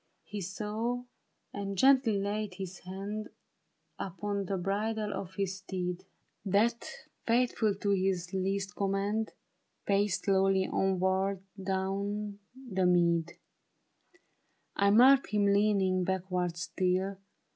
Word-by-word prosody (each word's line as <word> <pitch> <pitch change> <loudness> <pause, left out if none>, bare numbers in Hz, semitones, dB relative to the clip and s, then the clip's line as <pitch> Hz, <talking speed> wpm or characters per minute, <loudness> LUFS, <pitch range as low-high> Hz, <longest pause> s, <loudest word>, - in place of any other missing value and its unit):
He 210 -1 -6
saw, 215 +6 -3 0.5
and 200 -1 -4
gently 260 -3 +5
laid 205 0 -2
his 190 -1 -6
hand 200 +4 -5 0.7
Upon 200 +1 -3
the 195 +1 -2
bridle 210 +3 -1
of 185 -1 -6
his 195 -1 -2
steed. 180 -2 -4 0.4
THE 200 - -5
BARRICADE. 210 +5 +4
That, - - -8 0.4
faithful 230 -3 +2
to 200 0 -1
his 185 -2 0
least 195 +1 -1
command, 200 +2 0 0.5
Paced 200 -1 +1
slowly 190 -1 +3
onward 190 0 +1 0.2
down 200 +2 -2 0.3
the 185 -1 +2
mead. 170 -1 +3 1.4
I 200 0 +3
marked 255 +6 +7
him 205 -1 +2
leaning 200 -2 +3
backward 180 -2 -1
still. 185 +2 -1
195 Hz, 115 wpm, -31 LUFS, 190-210 Hz, 1.4 s, marked